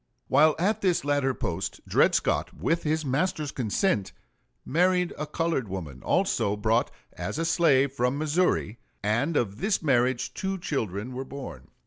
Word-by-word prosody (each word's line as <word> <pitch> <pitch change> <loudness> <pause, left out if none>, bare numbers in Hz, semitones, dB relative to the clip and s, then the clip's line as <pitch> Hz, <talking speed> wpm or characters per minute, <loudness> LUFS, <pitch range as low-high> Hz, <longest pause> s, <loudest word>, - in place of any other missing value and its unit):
While 150 +3 +5
at 210 +5 0
this 180 -7 +1
latter 140 -2 +1
post 85 +3 -3
Dred - - +4
Scott, - - 0
with 165 +1 0
his 155 0 -1
master's 150 +2 -1
consent, 110 - 0 0.5
married 180 +3 +2
a 150 - -4
colored 155 -5 -1
woman, 80 -9 -6
also 120 - +1
brought 110 +3 +1 0.2
as - - -5
a 165 - 0
slave 140 -5 +3
from 125 0 0
Missouri, 155 - 0 0.2
and 120 +10 +1
of 100 -4 -1
this 195 -2 0
marriage 130 -3 +1
two 190 0 -3
children 120 - -3
were 130 +1 -4
born. 125 - -9
140 Hz, 150 wpm, -27 LUFS, 115-165 Hz, 0.5 s, While